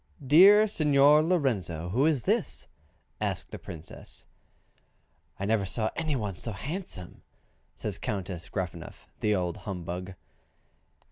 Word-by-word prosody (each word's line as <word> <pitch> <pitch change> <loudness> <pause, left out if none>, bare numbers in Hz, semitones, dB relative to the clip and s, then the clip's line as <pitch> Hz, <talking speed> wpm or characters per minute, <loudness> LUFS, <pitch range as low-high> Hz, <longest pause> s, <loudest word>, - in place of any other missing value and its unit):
"Dear 195 +10 +8
Signor 150 -6 +5
Lorenzo, 110 - 0
who 130 - +2
is 145 -7 +1
this?" - - 0 0.5
asked - - -3
the - - -7
Princess. 80 -1 -7 1.1
"I 100 - -2
never 110 -1 +2
saw 110 +3 -1
any 155 -3 -1
one 105 -6 -2
so 110 +5 -2
handsome," 140 - -5 0.5
says - - -4
Countess 90 -4 -4
Gruffanuff 85 -3 -6
(the 105 -1 +2
old 90 -3 -2
humbug). 90 -1 -6
105 Hz, 120 wpm, -28 LUFS, 90-150 Hz, 1.1 s, Dear